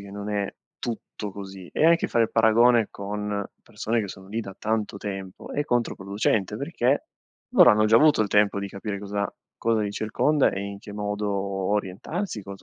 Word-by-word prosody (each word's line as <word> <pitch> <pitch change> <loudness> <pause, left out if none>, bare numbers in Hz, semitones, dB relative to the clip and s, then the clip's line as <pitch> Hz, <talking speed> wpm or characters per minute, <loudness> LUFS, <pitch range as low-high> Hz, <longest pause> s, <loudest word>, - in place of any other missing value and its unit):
che 100 0 -10
non 100 +1 -5
è 100 -1 -1 0.3
tutto 110 -3 -5
così. 95 -2 -9
E - - +1
anche 170 +1 +5
fare 115 -1 +3
il - - -5
paragone 115 0 +5
con 105 0 -3 0.2
persone 115 +1 -1
che 105 - -3
sono 95 0 -10
lì 110 +3 -2
da 95 -3 -8
tanto 110 -2 -1
tempo 95 -2 -6
è 145 - 0
controproducente, 105 -5 0
perché - - 0 0.4
loro - - +8
hanno 105 0 +4
già 110 +1 +6
avuto 150 -4 +5
il 105 - -2
tempo 105 0 +3
di 100 - -4
capire 100 +1 -5
cosa 100 -1 -2 0.3
cosa 115 -1 +1
li 105 -1 -2
circonda 140 +8 +2
e 95 - -4
in 100 0 -5
che 105 - -10
modo 105 0 -2
orientarsi, 100 - -2
cos 100 0 -9
105 Hz, 185 wpm, -25 LUFS, 100-110 Hz, 0.4 s, loro